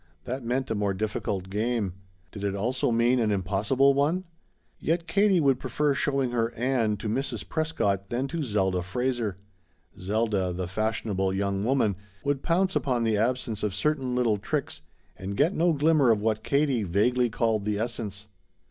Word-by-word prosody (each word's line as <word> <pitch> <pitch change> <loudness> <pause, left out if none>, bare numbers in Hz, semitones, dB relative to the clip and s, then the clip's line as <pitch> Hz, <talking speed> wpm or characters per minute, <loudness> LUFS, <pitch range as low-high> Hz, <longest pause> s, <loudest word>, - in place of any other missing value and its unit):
That 130 +1 -4
meant 125 +1 -1
a - - +3
more 100 -2 0
difficult 100 -2 -2
game. 110 -2 -1 0.4
Did 100 - -8
it 100 -1 -1
also 125 +7 0
mean 120 +2 +3
an 110 -2 +2
impossible 105 +8 +2
one? 150 +7 +1 0.6
Yet 165 +1 0
Katie 195 +2 +3
would 135 -4 +3
prefer 150 -1 0
showing 135 -3 0
her 115 -1 0
Ann 115 -4 +1
to 110 - -5
Mrs. 120 0 -2
Prescott 100 - -1
than 125 +3 -1
to 165 +1 -3
Zelda 95 -8 0
Fraser. 115 +1 -2 0.6
Zelda, 100 -2 0
the 90 0 -3
fashionable 100 -1 -1
young 100 0 -1
woman, 110 -6 +1 0.3
would 140 -1 0
pounce 185 +4 +1
upon 125 -4 +1
the 110 -1 +2
absence 115 -1 -1
of 105 -3 -1
certain 135 +2 0
little 120 -4 +2
tricks - - -3 0.4
and 100 +1 -5
get 160 +7 +3
no 170 -1 +3
glimmer 150 -3 +3
of 110 -2 +4
what 110 0 0
Katie 140 -4 +1
vaguely 120 +7 +2
called 110 -1 0
the 105 -1 0
essence. 105 -3 -4
115 Hz, 165 wpm, -27 LUFS, 100-135 Hz, 0.6 s, of